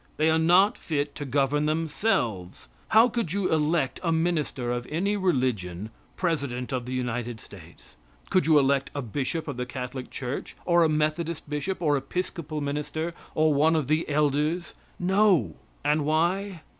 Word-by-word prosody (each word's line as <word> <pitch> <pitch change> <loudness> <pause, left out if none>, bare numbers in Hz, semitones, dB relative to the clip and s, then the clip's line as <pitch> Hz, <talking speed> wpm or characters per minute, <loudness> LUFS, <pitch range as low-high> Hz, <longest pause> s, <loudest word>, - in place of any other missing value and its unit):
They 155 +1 +3
are 160 - +3
not 180 +7 +4
fit 145 -2 -2
to 145 - -6
govern 140 +2 +1
themselves. 150 - -1 0.2
How 220 +2 +6
could 230 -9 -2
you 200 -2 0
elect 150 -3 +1
a 170 -2 0
minister 160 -7 0
of 120 0 -3
any 195 +7 0
religion 120 - -1 0.2
president 140 -8 -2
of 125 -1 -2
the 130 - -4
United 120 -2 -3
States. 85 -5 -15 0.3
Could 185 -4 +3
you 155 -2 +6
elect 135 -1 +2
a 140 - -2
bishop 140 - -2
of 140 -4 -4
the 125 0 -3
Catholic 125 0 -6
church, 130 0 -5
or 170 -1 +4
a 160 - +3
Methodist 155 +2 -1
bishop, 160 +5 -3
or 145 -2 +3
Episcopal 155 +1 -4
minister, 150 +3 -3 0.2
or 155 -1 +3
one 155 +3 +3
of 155 -5 0
the 155 +2 +1
elders? 150 +4 0 0.3
No. 190 -1 +3 0.3
And 150 +1 +2
why? 175 +4 0
150 Hz, 160 wpm, -26 LUFS, 130-170 Hz, 0.3 s, How